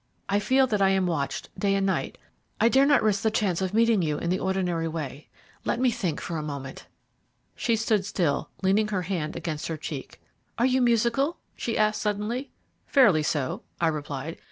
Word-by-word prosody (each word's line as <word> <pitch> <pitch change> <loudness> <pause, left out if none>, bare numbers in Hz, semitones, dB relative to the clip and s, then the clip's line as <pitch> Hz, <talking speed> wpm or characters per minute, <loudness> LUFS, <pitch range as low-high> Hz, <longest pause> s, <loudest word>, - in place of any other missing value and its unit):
I 200 +1 +2
feel 260 +5 +3
that 210 -5 -1
I 195 - +5
am 190 -1 +2
watched 155 -6 -2
day 195 -1 +1
and 195 0 +1
night. 190 - -1 0.4
I 230 - +5
dare 270 +3 +5
not 285 - +4
risk 210 -2 +2
the 220 - +2
chance 195 -5 0
of 190 -1 -1
meeting 225 -1 +3
you 150 -3 0
in 170 - -2
the 185 - +1
ordinary 180 -3 0
way. 155 -3 -6 0.3
Let - - -1
me 255 -1 +3
think 180 -8 -2
for 165 - -4
a - - -2
moment." 140 -3 -7 0.7
She 230 - +1
stood 215 -2 +1
still, 180 -6 -1
leaning 200 +3 +3
her 195 -4 -1
hand 165 -4 -3
against 155 -3 -4
her 160 - -3
cheek. 145 -3 -7 0.4
"Are 235 - +3
you 260 0 +3
musical?" 240 +6 +2 0.2
she 230 - -2
asked 215 0 +2
suddenly. 215 +6 -2 0.4
"Fairly 210 - +5
so," 150 - -1 0.2
I 165 - +3
replied. 150 0 -5
195 Hz, 195 wpm, -26 LUFS, 165-225 Hz, 0.7 s, I